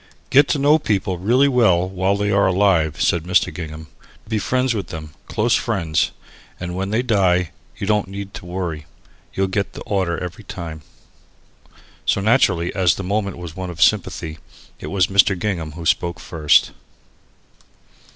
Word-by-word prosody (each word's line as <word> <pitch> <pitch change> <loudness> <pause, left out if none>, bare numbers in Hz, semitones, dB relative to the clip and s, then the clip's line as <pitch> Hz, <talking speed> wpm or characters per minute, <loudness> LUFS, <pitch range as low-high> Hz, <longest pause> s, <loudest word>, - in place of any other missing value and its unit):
"Get 140 +1 +6
to - - +1
know 145 +3 +4
people 95 - -1
really 125 +9 +3
well 110 -10 +3
while 95 +1 0
they 105 0 0
are 100 -1 +3
alive," 90 -6 +2
said 85 - +2
Mr. 90 +1 +2
Gingham; 80 -2 -7 0.4
"be 110 -1 -1
friends 130 +4 0
with 100 -5 -3
them, 75 -3 -8
close 115 +2 +1
friends 85 -9 +1 0.5
and 90 0 -4
then - - -6
when 95 +1 -2
they 110 +4 0
die 90 -7 +2 0.3
you 105 - -4
don't 105 -1 +1
need 100 0 -7
to 90 - -9
worry. 85 -5 -4 0.5
You'll 95 - +1
get 100 +1 -2
the - - -9
order 95 -4 -1
every 90 +3 -7
time." 80 -5 -7 1.3
So, - - +2
naturally, 95 -6 +2
as 90 -4 +3
the 95 - -5
moment 100 0 -2
was 85 -2 -8
one 95 -1 -5
of 85 -2 -9
sympathy, 85 -4 +1 0.4
it - - -7
was 95 -2 +2
Mr. 95 0 +3
Gingham 85 -6 -3
who 85 +1 -8
spoke 85 +2 0
first. 80 -5 +2
95 Hz, 170 wpm, -20 LUFS, 85-105 Hz, 1.3 s, Get